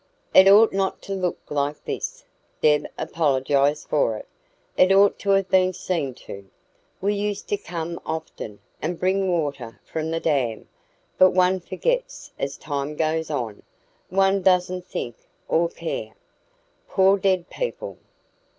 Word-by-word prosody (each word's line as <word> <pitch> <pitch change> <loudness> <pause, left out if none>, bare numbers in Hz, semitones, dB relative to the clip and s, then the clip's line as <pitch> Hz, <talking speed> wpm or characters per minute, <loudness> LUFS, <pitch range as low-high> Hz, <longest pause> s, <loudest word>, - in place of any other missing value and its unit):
"It 190 - +8
ought 210 +3 +7
not 195 0 0
to 195 - -4
look 185 -2 -1
like 145 0 -2
this," - - -5 0.3
Deb 150 -1 +3
apologised 145 -1 +1
for 115 -7 +1
it. - - -10 0.5
"It 185 +1 +5
ought 195 +1 +5
to 200 - -4
have 195 -1 +3
been 185 0 +3
seen 165 -8 -2
to. 100 -1 -9 0.5
We 200 +2 +1
used 205 0 -3
to - - +2
come 170 -2 -5
often, 155 -9 -6 0.2
and 165 +2 -3
bring 190 +1 +1
water 145 -9 -2
from 160 0 -3
the 165 0 -1
dam. 130 -9 -1 0.5
But 185 - +7
one 185 0 +3
forgets - - -3
as - - -3
time 145 0 -4
goes 160 +1 0
on; 120 -8 -3 0.5
one 195 +1 +3
doesn't 180 0 +2
think 120 -1 -5 0.3
or 170 +1 +2
care. 110 -11 -5 0.7
Poor 195 +1 +4
dead 185 -2 +1
people! - - -5
170 Hz, 140 wpm, -24 LUFS, 145-190 Hz, 0.7 s, It